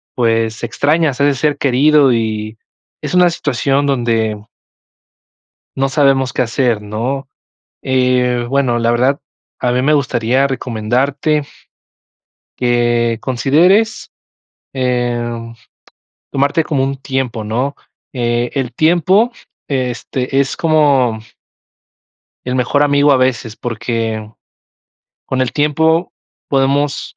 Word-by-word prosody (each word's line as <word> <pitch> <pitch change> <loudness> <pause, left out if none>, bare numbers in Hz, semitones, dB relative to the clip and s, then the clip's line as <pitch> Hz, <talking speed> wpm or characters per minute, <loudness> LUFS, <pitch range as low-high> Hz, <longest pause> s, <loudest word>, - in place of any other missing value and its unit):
pues, 115 -2 0
extrañas 145 +3 0
a 140 - +4
ese 135 -3 0
ser 150 -1 +1
querido 140 0 +4
y 110 -1 -2 0.4
es - - -5
una 180 -1 +5
situación 140 -1 0
donde 115 -5 0 1.4
no 135 0 0
sabemos 135 -3 +2
qué - - 0
hacer, 120 -2 0
¿no? 120 +6 -4 0.5
Eh, 125 -2 +1
bueno, 130 -3 +1
la 115 0 +1
verdad, 130 +4 +1 0.4
a 125 - 0
mí 125 +1 +1
me 150 +3 +2
gustaría 130 -1 +1
recomendarte, 135 +5 -1 1.1
que 120 -2 +1
consideres, 170 - +2 0.6
em, 120 -2 -2 0.8
tomarte 140 +4 +1
como 140 -4 -1
un 135 0 -2
tiempo, 130 -5 -3
¿no? 125 +7 -2 0.4
Eh, 120 -1 -1
el 130 -3 -2
tiempo, 180 +8 +3 0.4
este, 130 0 -2
es 135 - -1
como 140 -8 +2 1.3
el 125 0 -2
mejor 135 +3 +1
amigo, 145 0 +3
a 135 - +5
veces, 120 -3 -1
porque 115 -2 -3 1.0
con 130 -1 -2
el 130 - 0
tiempo 160 +3 +1 0.4
podemos, 140 +1 0
130 Hz, 110 wpm, -16 LUFS, 120-140 Hz, 1.4 s, una